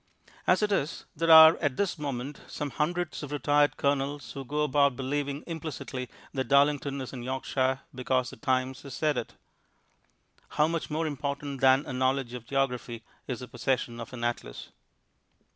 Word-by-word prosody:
As -, -, +4 dB
it 210 Hz, -, +1 dB
is, 155 Hz, -6 st, -1 dB
there 165 Hz, +2 st, 0 dB
are 160 Hz, 0 st, +10 dB
at 145 Hz, -4 st, -1 dB
this 190 Hz, -5 st, -1 dB
moment 140 Hz, -1 st, -4 dB
some 145 Hz, -1 st, -4 dB
hundreds 170 Hz, +5 st, -2 dB
of 150 Hz, -1 st, -7 dB
retired 145 Hz, +1 st, +2 dB
colonels 140 Hz, +1 st, -1 dB
who 135 Hz, -, -6 dB
go 150 Hz, +3 st, -1 dB
about 140 Hz, -2 st, +3 dB
believing 140 Hz, +2 st, -2 dB
implicitly 155 Hz, -6 st, -5 dB, 0.2 s
that 130 Hz, -2 st, -2 dB
Darlington 140 Hz, +1 st, +3 dB
is 130 Hz, -, -7 dB
in 125 Hz, -, -6 dB
Yorkshire 130 Hz, +1 st, -1 dB
because 130 Hz, -1 st, 0 dB
The -, -, -11 dB
Times 130 Hz, +2 st, -1 dB
has 140 Hz, -3 st, -8 dB
said 155 Hz, -2 st, +1 dB
it. -, -, -4 dB, 1.2 s
How 150 Hz, -, +5 dB
much 165 Hz, 0 st, -3 dB
more 160 Hz, +2 st, -1 dB
important 140 Hz, -2 st, -4 dB
than 135 Hz, +1 st, +5 dB
a 135 Hz, -, -5 dB
knowledge 130 Hz, -1 st, 0 dB
of 120 Hz, -2 st, -8 dB
geography 125 Hz, -4 st, -1 dB, 0.2 s
is 125 Hz, -2 st, -4 dB
the 125 Hz, -, -7 dB
possession 125 Hz, -1 st, -2 dB
of 115 Hz, -, -7 dB
an 120 Hz, -2 st, -7 dB
atlas. 120 Hz, -, -4 dB
140 Hz, 170 wpm, -28 LUFS, 130-150 Hz, 1.2 s, are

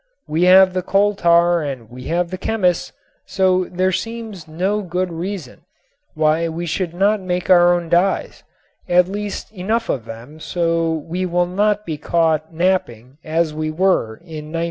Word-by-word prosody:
We 165 Hz, +4 st, +1 dB
have 185 Hz, 0 st, +7 dB
the 185 Hz, -, -1 dB
coal 200 Hz, +3 st, +2 dB
tar 170 Hz, -2 st, +3 dB
and 135 Hz, -6 st, -5 dB
we 125 Hz, +1 st, -10 dB
have 170 Hz, +1 st, -1 dB
the 185 Hz, -, -4 dB
chemists, 185 Hz, -5 st, 0 dB, 0.4 s
so 185 Hz, -1 st, +2 dB
there 185 Hz, +1 st, 0 dB
seems 225 Hz, -4 st, -5 dB
no 190 Hz, +7 st, -1 dB
good 180 Hz, -1 st, -3 dB
reason 170 Hz, -5 st, -6 dB, 0.5 s
why 155 Hz, +2 st, +2 dB
we 170 Hz, +2 st, -4 dB
should 170 Hz, +1 st, -3 dB
not 200 Hz, +3 st, +2 dB
make 180 Hz, 0 st, -2 dB
our 175 Hz, -1 st, +6 dB
own 175 Hz, -1 st, -3 dB
dyes, 175 Hz, +4 st, 0 dB, 0.5 s
at 180 Hz, 0 st, +4 dB
least 205 Hz, +1 st, -5 dB
enough 220 Hz, +4 st, -2 dB
of 120 Hz, -5 st, -2 dB
them 120 Hz, +8 st, -10 dB
so 165 Hz, 0 st, 0 dB
we 165 Hz, +4 st, -3 dB
will 175 Hz, 0 st, +1 dB
not 205 Hz, +3 st, 0 dB
be 160 Hz, -3 st, -4 dB
caught 160 Hz, -1 st, 0 dB
napping 155 Hz, -7 st, -1 dB
as 160 Hz, 0 st, 0 dB
we 155 Hz, 0 st, -3 dB
were 155 Hz, -9 st, +1 dB
in 155 Hz, -3 st, -9 dB
1914. 165 Hz, -, -2 dB
175 Hz, 165 wpm, -19 LUFS, 160-185 Hz, 0.5 s, have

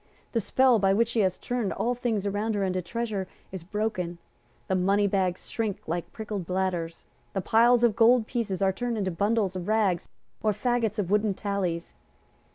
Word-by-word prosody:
The 230 Hz, -, +1 dB
spell 255 Hz, +2 st, +3 dB
by 195 Hz, 0 st, +3 dB
which 230 Hz, +2 st, +2 dB
she 235 Hz, -, 0 dB
has 190 Hz, -3 st, +2 dB
turned 245 Hz, -5 st, -2 dB
all 245 Hz, -, 0 dB
things 235 Hz, -5 st, -1 dB
around 210 Hz, +2 st, -1 dB
her 200 Hz, -, 0 dB
into 185 Hz, -1 st, 0 dB
treasure 210 Hz, 0 st, -3 dB, 0.2 s
is 185 Hz, -3 st, -6 dB
broken. 185 Hz, -3 st, -2 dB, 0.5 s
The -, -, 0 dB
money 195 Hz, +3 st, +3 dB
bags 185 Hz, -2 st, 0 dB
shrink 220 Hz, -4 st, -2 dB
like 170 Hz, +1 st, -3 dB
pricked 210 Hz, -3 st, -5 dB
bladders. 180 Hz, -3 st, -2 dB, 0.3 s
The 195 Hz, -, -1 dB
piles 235 Hz, +5 st, +4 dB
of 230 Hz, -3 st, +4 dB
gold 230 Hz, 0 st, +5 dB
pieces 215 Hz, -6 st, -2 dB
are 190 Hz, 0 st, +3 dB
turned 240 Hz, +2 st, -2 dB
into 190 Hz, -3 st, -1 dB
bundles 200 Hz, +2 st, 0 dB
of 180 Hz, -1 st, -4 dB
rags 210 Hz, -5 st, +1 dB, 0.3 s
or 215 Hz, -1 st, +2 dB
faggots 235 Hz, -1 st, 0 dB
of 195 Hz, -3 st, -1 dB
wooden 210 Hz, -1 st, +2 dB
tallies. 185 Hz, -, -2 dB
205 Hz, 180 wpm, -27 LUFS, 185-225 Hz, 0.5 s, gold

